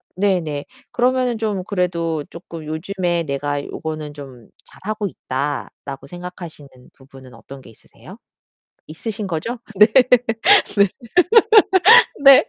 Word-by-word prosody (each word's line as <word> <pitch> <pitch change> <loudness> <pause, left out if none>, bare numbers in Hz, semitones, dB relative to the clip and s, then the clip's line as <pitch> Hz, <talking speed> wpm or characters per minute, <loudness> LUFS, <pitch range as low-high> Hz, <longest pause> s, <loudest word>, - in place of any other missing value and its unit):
네네. 175 -7 -1 0.3
그러면은 250 -1 0
좀 210 -4 -2
그래도 170 -5 -2
쪼끔 165 -2 -10
요즘에 175 +2 -2
내가 145 0 -3
'요거는 155 -1 -6
좀 135 -5 -12 0.2
잘하고 215 +1 -5
있다.'라고 140 -2 -6
생각하시는 175 -3 -10 0.3
부분은 130 -2 -16
어떤 135 +4 -13
게 - - -16
있으세요? - - -16 0.7
있으신거죠? 200 +5 -5 0.2
네. 210 +2 +7 0.9
네. 200 -1 +4 1.3
네. 275 -1 +8
165 Hz, 245 characters per minute, -19 LUFS, 145-200 Hz, 1.3 s, 네